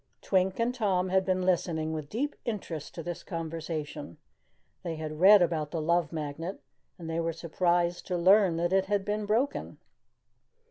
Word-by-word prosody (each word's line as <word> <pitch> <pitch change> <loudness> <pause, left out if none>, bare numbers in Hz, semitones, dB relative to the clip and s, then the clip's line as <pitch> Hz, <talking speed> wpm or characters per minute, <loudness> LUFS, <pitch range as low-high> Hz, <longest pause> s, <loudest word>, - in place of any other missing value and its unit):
Twink 190 -1 +1
and 235 +2 +1
Tom 190 -6 0
had 190 +1 +3
been 185 -1 +1
listening 165 -3 0
with 155 -2 -5
deep 285 +7 -2
interest 180 - -5
to 165 - -5
this 175 0 -5
conversation. 160 - -5 0.6
They 170 -2 -4
had 155 -1 -6
read 195 +1 +8
about 155 -3 -1
the 165 - -3
Love 170 0 +1
Magnet 160 +4 -5 0.4
and 170 -3 -8
they 165 0 -2
were 165 0 0
surprised 175 +1 0
to 180 - -1
learn 185 0 +5
that 175 +2 0
it 190 0 +3
had 200 0 0
been 210 0 -2
broken. 240 +7 -1
175 Hz, 170 wpm, -29 LUFS, 160-190 Hz, 0.6 s, read